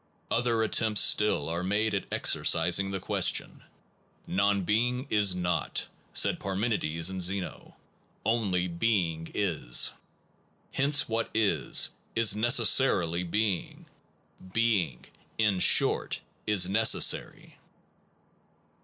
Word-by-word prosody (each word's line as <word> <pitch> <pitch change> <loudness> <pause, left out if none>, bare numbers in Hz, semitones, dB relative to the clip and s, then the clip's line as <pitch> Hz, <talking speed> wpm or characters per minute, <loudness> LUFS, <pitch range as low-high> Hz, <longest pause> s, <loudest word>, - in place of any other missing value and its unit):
Other 115 -1 0
attempts 110 -1 +2
still 105 -9 +2
are 85 +2 -3
made 105 +4 -1
at 100 - -4
exorcising 100 0 +1
the 95 0 -4
question. - - 0 0.6
Non 100 +1 0
being 125 +6 -1
is 105 -3 +3
not, 90 -1 -2 0.2
said - - +1
Parmen 100 +5 -2
ides 85 -1 0
and 95 -1 -5
Zeno; 95 +1 -4 0.5
only 100 -6 0
being 85 -3 -1
is. 80 -11 +1 0.8
Hence 140 +1 +1
what 115 0 -2
is, 100 -10 +1 0.3
is 115 -3 +3
necessarily 110 -6 +2
being 100 +1 -3 0.7
being, 100 - -1 0.3
in 105 -4 +1
short, - - +2 0.3
is 105 -4 +2
neces 110 +4 +3
sary. - - -2
100 Hz, 105 wpm, -28 LUFS, 90-110 Hz, 0.8 s, is